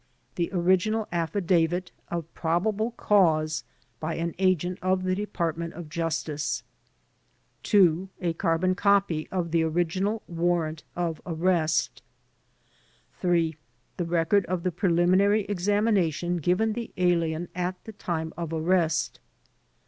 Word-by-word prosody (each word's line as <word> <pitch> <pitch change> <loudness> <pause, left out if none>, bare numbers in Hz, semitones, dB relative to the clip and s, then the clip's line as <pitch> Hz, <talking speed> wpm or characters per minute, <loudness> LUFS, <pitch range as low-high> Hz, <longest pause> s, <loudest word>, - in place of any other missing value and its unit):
The 170 -1 -1
original 190 +4 +2
affidavit 175 0 +1 0.2
of 170 -1 -4
probable 200 +7 0
cause 155 -7 +3 0.4
by 160 +1 -3
an 170 0 -2
agent 185 -1 +1
of 185 0 +1
the 185 0 +1
Department 170 -4 -3
of 165 -2 -8
Justice. 155 -2 -2 1.0
2. 185 -3 +3
A 170 -2 -1
carbon 170 +2 +1
copy 200 -5 +2
of 175 -3 -2
the 165 0 +3
original 175 +6 0
warrant 170 -2 0
of 170 -3 -2
arrest. 165 -2 0 1.2
3. 170 -3 +1 0.4
The 175 - -1
record 170 +4 +2
of 180 -1 -2
the 185 - 0
preliminary 185 +4 +3
examination 195 -3 +1
given 180 +7 +1
the 235 +1 -5
alien 175 -2 +1
at 180 +1 -2
the 220 - -9
time 160 -5 -3
of 170 -2 -4
arrest. 165 -1 +1
175 Hz, 120 wpm, -27 LUFS, 165-185 Hz, 1.2 s, cause